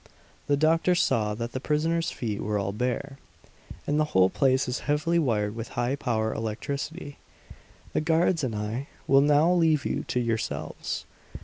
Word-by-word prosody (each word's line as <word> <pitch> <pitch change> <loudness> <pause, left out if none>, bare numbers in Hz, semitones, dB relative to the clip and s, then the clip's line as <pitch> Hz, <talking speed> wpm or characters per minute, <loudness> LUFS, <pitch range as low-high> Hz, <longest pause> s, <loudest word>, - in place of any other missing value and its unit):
The 145 - +3
doctor 165 +4 +3
saw 105 -10 +1
that 115 +2 -4
the 130 - -3
prisoners' 165 +4 0
feet 110 -4 -4
were 105 0 -1
all 100 -1 -1
bare. 125 +5 -3 0.7
"And 150 +1 +1
the 155 - +3
whole 95 0 +5
place 130 -1 +2
is 125 - -2
heavily 160 +3 +2
wired 105 -8 0
with 115 +1 -7
high 120 +3 +1
power 110 -5 -1
electricity! 140 +7 -5 0.7
"The - - +1
guards 165 0 +2
and 120 -4 -1
I 110 +6 -3 0.2
will 135 0 +5
now 150 +4 +4
leave 160 -5 +3
you - - -1
to 125 - 0
yourselves." 115 -2 -3
135 Hz, 165 wpm, -27 LUFS, 115-155 Hz, 0.7 s, whole